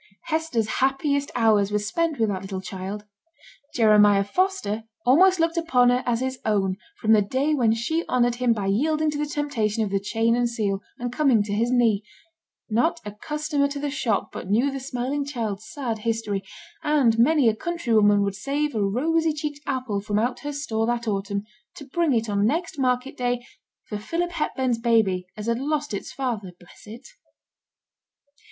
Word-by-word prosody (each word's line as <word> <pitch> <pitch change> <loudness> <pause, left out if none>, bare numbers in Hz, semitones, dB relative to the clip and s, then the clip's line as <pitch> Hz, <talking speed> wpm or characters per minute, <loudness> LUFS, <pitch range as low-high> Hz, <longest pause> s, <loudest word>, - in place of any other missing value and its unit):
Hester's 310 -9 -1
happiest 280 +1 +1
hours 215 -4 +3
were 210 - +2
spent 305 +10 -1
with 220 -2 +2
that 190 -2 -2
little 195 -1 -5
child. 195 +2 -6 0.7
Jeremiah 210 -3 +5
Foster 225 - -1 0.2
almost 360 +9 +5
looked 330 +1 +1
upon 250 -7 +3
her 250 0 +2
as 240 0 +1
his 260 0 -3
own 195 -3 +1 0.2
from 220 - +1
the 215 - +6
day 265 +9 0
when 235 -6 +3
she 320 +9 -1
honoured 245 -1 +2
him 245 0 +1
by 210 -4 0
yielding 305 +10 +1
to 295 - -4
the 300 - -1
temptation 230 -8 -1
of 205 - -3
the 200 - +1
chain 225 +3 +1
and 240 0 +1
seal, 205 -4 -1 0.2
and 245 0 -4
coming 250 -6 +3
to 205 0 -4
his 230 +3 +1
knee; 230 -5 +2 0.6
not 320 +10 +1
a 210 - -5
customer 300 +5 -1
to 285 0 -6
the 285 0 -2
shop 230 -7 -1
but - - -7
knew 240 +7 +2
the 270 - -4
smiling 265 +2 -2
child's 220 -7 -4
sad 240 -6 -3
history, 220 -3 -2 0.4
and 265 -7 +2
many 280 +1 +4
a 220 - +3
country 340 -3 -2
woman 205 -2 +5
would 200 -1 -1
save 280 +9 -2
a 220 - -1
rosy 315 +11 +1
cheeked 295 -1 -4
apple 255 -7 -2
from 205 0 -2
out 245 +3 0
her 290 - -5
store 230 -6 -2
that 240 -1 -1
autumn 200 0 -2 0.3
to 285 - -10
bring 325 +3 0
it 230 -2 +1
on 200 -1 0
next 325 +2 -2
market 255 0 0
day 245 -1 -1 0.4
for 210 - -6
'Philip 345 +10 -2
Hepburn's 260 -7 -1
baby, 220 -6 +2
as 210 - -5
had 230 +1 0
lost 295 -1 -2
its 200 - -5
father, 225 -9 -3
bless 175 +3 -17
it.' 225 +4 -10
240 Hz, 185 wpm, -24 LUFS, 210-285 Hz, 0.7 s, the